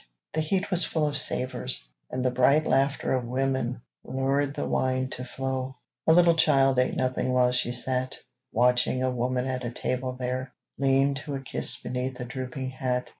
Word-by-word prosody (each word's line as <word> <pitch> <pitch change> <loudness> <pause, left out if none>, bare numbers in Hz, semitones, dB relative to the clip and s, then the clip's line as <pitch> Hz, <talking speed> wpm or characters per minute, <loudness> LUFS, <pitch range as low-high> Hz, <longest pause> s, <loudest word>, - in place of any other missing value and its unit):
The 160 - 0
heat 190 +6 -1
was 180 -1 +4
full 160 -2 0
of 145 -1 -2
savors, 125 - +3 0.2
and 130 0 -3
the 125 - +2
bright 140 +5 +3
Laughter 135 +1 +1
of 130 -1 0
women 130 0 -2 0.2
lured 140 +2 -1
the - - -3
wine 130 0 0
to 125 - -6
flow. 130 +1 -4 0.3
A - - +7
little 170 0 +5
child 135 -5 +3
ate 130 - +1
nothing 130 0 -1
while 125 -1 +3
she 120 -1 0
sat 130 +1 -1 0.3
Watching 125 +2 +2
a 130 - +1
woman 125 +1 -1
at 130 -1 -3
a 120 - -2
table 125 +1 -3
there 130 0 -4 0.3
Lean 135 0 +3
to 145 -2 -4
a - - -3
kiss 135 - +2
beneath 125 +1 -4
a 125 - -4
drooping 130 +1 -5
hat. 125 -1 -2
130 Hz, 180 wpm, -26 LUFS, 125-135 Hz, 0.3 s, A